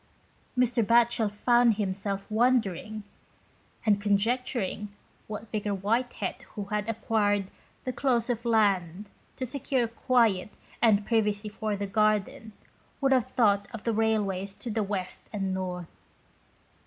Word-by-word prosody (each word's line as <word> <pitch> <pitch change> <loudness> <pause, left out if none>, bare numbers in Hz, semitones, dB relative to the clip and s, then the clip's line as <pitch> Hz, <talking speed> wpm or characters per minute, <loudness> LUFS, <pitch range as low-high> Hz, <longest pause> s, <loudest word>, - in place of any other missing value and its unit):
Mr. 250 -1 +3
Batchel 230 -1 +3
found 240 +2 +4
himself 200 0 -3
wondering 215 -3 +1 0.8
and 205 -2 +3
conjecturing 210 0 0 0.4
what 215 +1 -6
Vicar 210 -2 -1
White 230 +6 0
head, - - -4
who 205 - -3
had 210 +2 -2
acquired 205 -3 0 0.3
the 255 - -3
close 240 -2 +1
of 235 -2 -2
land 200 -4 +1 0.2
to 260 - -3
secure 255 -1 0
quiet 225 -4 +1 0.2
and 210 -3 +4
privacy 210 -2 +1
for 215 0 -3
garden, 215 +1 0 0.5
would 275 -1 +2
have 255 -2 +3
thought 205 -5 +2
of 220 - -8
the 230 - 0
railways 205 -3 0
to 235 - -6
the 220 +1 0
west 195 -3 -4
and 195 -3 -2
north. 180 -2 -4
215 Hz, 130 wpm, -28 LUFS, 200-235 Hz, 0.8 s, found